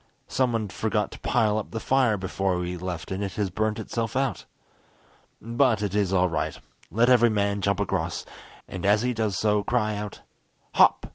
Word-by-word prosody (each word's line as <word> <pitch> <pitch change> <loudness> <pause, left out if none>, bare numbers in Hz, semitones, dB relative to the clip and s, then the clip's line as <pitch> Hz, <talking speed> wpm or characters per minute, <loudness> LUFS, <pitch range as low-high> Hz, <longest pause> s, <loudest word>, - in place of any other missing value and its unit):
Someone 115 -5 0
forgot - - -1
to - - -10
pile 110 -1 +2
up 105 - -6
the 110 - -4
fire 125 -4 +2
before 95 0 -1
we 90 0 -3
left 90 -2 -5
and 95 +2 -2
it 100 -2 -4
has 100 -2 -2
burnt 110 +3 0
itself 115 +1 -3
out! 130 -7 -1 0.9
But 115 -1 +1
it 100 -2 -2
is 100 -3 +1
all 90 -1 +3
right. 85 - -2 0.3
Let 115 +4 +3
every 120 -2 +6
man 100 -1 0
jump 100 0 +1
across, 90 -5 -2 0.4
and 90 - -7
as 105 +3 +3
he 125 0 +1
does 110 -5 -1
so 105 0 +2
cry 110 -1 0
out 105 -1 -6 0.5
'Hop! - - +5
105 Hz, 185 wpm, -26 LUFS, 95-115 Hz, 0.9 s, every